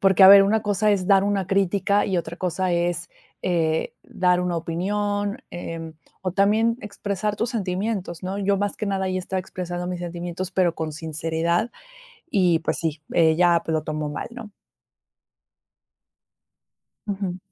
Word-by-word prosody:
porque 195 0 +5
a 190 - +11
ver 200 0 +10
una 215 +3 +2
cosa 210 0 +2
es 190 -3 +1
dar 195 -1 +5
una 200 -3 0
crítica 200 +1 +2
y 190 - 0
otra 170 +1 -5
cosa 185 0 -1
es, 170 0 0 0.4
eh, 165 -3 0
dar 180 -1 +1
una 180 -1 -1
opinión, 205 +5 -1
em, 165 -2 -6 0.3
o 185 - -1
también 215 +4 +3
expresar 205 0 -3
tus 230 +2 -1
sentimientos, 190 -3 -3
¿no? 190 +2 -3
Yo 200 0 +1
más 205 0 -1
que 215 - -3
nada, 190 -1 -1
ahí 185 0 -1
estaba 185 +1 -3
expresando 180 -1 -5
mis 180 -1 -3
sentimientos, 175 +1 -5
pero 180 -3 +2
con 160 -1 -3
sinceridad 165 +5 -1 0.6
y 180 -4 +3
pues 160 - -1
sí, 160 -2 -2
ella 170 +1 +4
pues 160 - -2
lo 155 - 0
tomó 155 0 -3
mal, - - -5
¿no? 235 -3 -9 2.6
Ujú. 195 -3 -3
185 Hz, 160 wpm, -24 LUFS, 170-200 Hz, 2.6 s, a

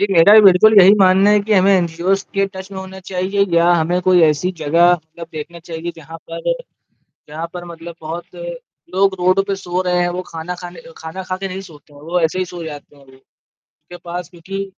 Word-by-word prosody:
ये 200 - +3
मेरा 175 +4 +6
बिल्कुल 195 +4 +6
यही 195 +3 +7
मानना 190 +2 +5
है 210 0 +4
कि 215 +2 -2
हमें 190 +1 +4
एनजीओज़ 175 +3 -1
के 195 0 +1
टच 190 +1 -8
में 190 - -6
होना 190 0 -9
चाहिए 190 +2 0
या 170 +1 +4
हमें 175 +1 +1
कोई 180 -1 +5
ऐसी 155 +3 +2
जगह 165 +3 +3
मतलब 165 0 -6
देखना 160 +3 -8
चाहिए 165 +1 -5
जहाँ 165 +1 -11 0.2
पर 165 - -6 0.9
जहाँ 160 +2 -5
पर 175 -1 -7
मतलब 165 0 -10
बहुत 170 +3 -7 0.6
लोग 195 0 +3
रोड 185 +2 +3
पे 195 - -1
सो 180 0 -2
रहे 180 0 +1
हैं 175 - +1
वो 180 +1 -4
खाना 165 +2 -6
खाने 175 -1 -9 0.2
खाना 160 +4 -7
खा 185 - -1
के 195 - -4
नहीं 190 +1 -6
सोते 145 0 -18
हैं 145 - -15
वो 175 +3 -1
ऐसे 165 +2 0
ही 185 - 0
सो 175 -1 -7
जाते 145 -2 -10
हैं 140 - -19
वो, 130 - -19 0.5
उनके 175 - -16
पास 175 -1 -6
क्योंकि 190 +3 -6
175 Hz, 215 wpm, -18 LUFS, 165-190 Hz, 0.9 s, यही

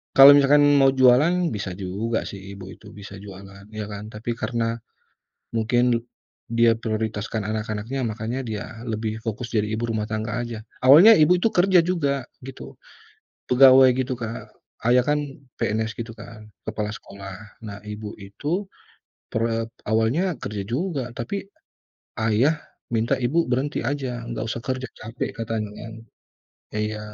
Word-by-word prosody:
kalau 135 +1 +11
misalkan 145 +1 +5 0.2
mau 135 0 +6
jualan, 130 +6 +5 0.2
bisa 100 -2 -4
juga 100 +4 -2
sih 100 - -8 0.2
ibu 95 -1 -9
itu, 105 - -14
bisa 100 -1 -10
jualan, 100 0 -12
ya 105 - -3
kan. 105 +1 -7
Tapi 110 +2 -4
karena, 115 -1 -1 0.8
mungkin 115 +2 +2
du - - +2 0.5
dia 115 0 +4
prioritaskan 110 -1 -3
anak-anaknya, 110 +4 -3
makanya 115 +3 -3
dia 110 -4 -4 0.2
lebih 110 -1 -3
fokus 115 +1 -5
jadi 105 -1 +2
ibu 115 +2 -1
rumah 105 -1 -1
tangga 110 +1 -2
aja. 120 -2 -5 0.2
Awalnya 165 +13 +9
ibu 180 +1 +5
itu 205 - +1
kerja 180 0 +5
juga, 140 -7 0 0.2
gitu, 65 - -9 0.8
pegawai 130 0 +8
gitu, 130 0 -1
Kak. 115 0 -6 0.3
ayah 120 +2 +5
kan 150 - +3 0.4
PNS 110 +1 -1
gitu 115 0 -5
kan, 110 0 -12 0.2
kepala 110 -1 -2
sekolah. 100 -2 -9 0.3
Nah, 100 -1 -7
ibu 105 0 -6
itu 150 - -3 0.6
per 110 - -1
e 115 0 -1 0.3
awalnya 125 - +1
kerja 100 -1 -4
juga, 140 - -2
tapi, 195 +12 -4 0.7
ayah 115 +8 +3 0.4
minta 115 +1 +2
ibu 165 +7 +2
berhenti 130 +1 -1
aja, 125 -3 -3
nggak 120 - -3
usah 115 - -3
kerja, 130 0 -3
capek 115 +2 -4
katanya, 110 -2 -3
kan. 110 0 -8 0.8
Iya, 105 0 -2
115 Hz, 145 wpm, -24 LUFS, 105-130 Hz, 0.8 s, kalau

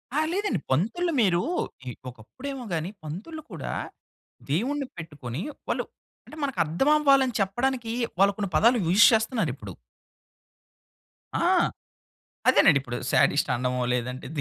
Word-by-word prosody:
ఆ! - - +3
లేదండి. 385 - 0
పంతుల్లు 230 - +1
మీరు, 180 -5 +3 0.7
ఒకప్పుడేమో 255 - -8
గాని, 165 +1 -2
పంతుల్లు 200 - -7
కూడా - - -5 0.8
దేవుణ్ణి 265 - 0
పెట్టుకొని, 150 -5 -6 0.3
వాళ్ళు - - 0 0.4
అంటే 310 - -12
మనకు 275 -2 -2
అర్థం 170 - +1
అవ్వాలని 275 -4 +4
చెప్పడానికి, 240 +4 -1 0.3
వాళ్ళు 200 +1 +5
కొన్ని 200 -3 -3
పదాలు 235 +9 +5
యూజ్ 190 +6 +7
చేస్తున్నారిప్పుడు. 195 - -1 1.6
ఆ! - - +1 1.0
అదేనండిప్పుడు, 130 -3 +4
శాడిస్ట్ - - +3
అనడమో, 125 +1 -1
లేదంటే 125 +1 -3
195 Hz, 110 wpm, -26 LUFS, -, 1.6 s, యూజ్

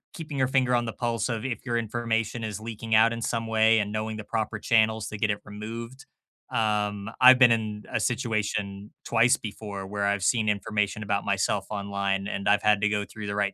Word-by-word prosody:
keeping 155 -4 -6
your 130 - +3
finger 130 -1 +2
on 120 0 +1
the 115 - -3
pulse 115 -1 -2
of 115 -1 -3
if 120 -4 -4
your 120 -1 0
information 115 0 -2
is 105 -2 -4
leaking 110 0 -3
out 115 +1 +5
in 115 - -5
some 115 0 -1
way 110 0 +4
and 105 0 -2
knowing 110 0 -3
the 105 - -6
proper 110 0 -2
channels 110 -1 +2
to 105 - -6
get 105 - +1
it 100 - 0
removed. 115 +5 -8 0.5
Um, 105 -2 0
I've 130 0 +9
been 125 -2 +7
in 110 -2 -1
a - - +1
situation 105 -4 -2
twice 120 +1 +4
before 100 -2 -7
where 100 +1 -3
I've 100 -1 0
seen 110 0 +2
information 105 0 -1
about 100 -1 -1
myself 100 +1 0
online, 100 -1 -2
and 100 0 -2
I've 105 - +4
had 105 -1 +3
to 105 - +2
go 105 -1 -1
through 110 -1 -8
the 100 - -3
right 100 -1 0
110 Hz, 215 wpm, -26 LUFS, 105-115 Hz, 0.5 s, I've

